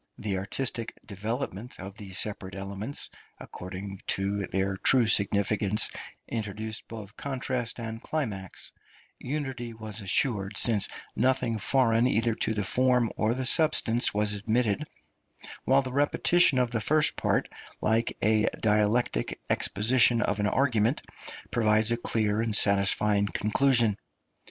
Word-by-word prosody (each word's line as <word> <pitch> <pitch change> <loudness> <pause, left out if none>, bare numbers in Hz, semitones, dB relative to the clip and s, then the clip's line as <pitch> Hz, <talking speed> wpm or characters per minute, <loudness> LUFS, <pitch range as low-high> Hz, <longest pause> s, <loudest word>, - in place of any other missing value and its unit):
The 100 -3 -3
artistic 115 +3 -2
development 110 +2 -5
of 95 +1 -8
the 100 -2 -11
separate 95 -1 -4
elements, 100 +7 -6 0.3
according 95 +2 -8
to 100 +1 -1
their 95 +1 -1
true 125 +5 +3
significance, 100 0 +2 0.4
introduced 110 0 -5
both 110 -2 -10
contrast 130 -3 -4
and 115 0 -6
climax; 105 - -5 0.5
unity 130 -4 -5
was 110 -1 -7
assured, 100 0 0
since 105 -2 +4 0.3
nothing 125 -2 0
foreign 120 0 +2
either 115 -1 +1
to 110 - -2
the 105 - -1
form 125 +3 +1
or 110 +2 0
the 130 0 -3
substance 125 -5 +5
was 105 0 0
admitted; 110 +6 -1 0.8
while 135 +1 +3
the 130 -1 -6
repetition 145 +2 +3
of 125 -2 +1
the 115 -2 -2
first 150 +5 +2
part, - - 0 0.3
like 115 +2 0
a 110 +1 +2
dialectic 105 - 0
exposition 120 +2 +3
of 105 - -2
an 105 - +1
argument, 120 0 +1 0.5
provided 110 -1 +3
a 120 - +1
clear 110 -2 -1
and 115 -2 +1
satisfying 100 0 +4
conclusion. 115 +1 +2
110 Hz, 125 wpm, -27 LUFS, 100-125 Hz, 0.8 s, substance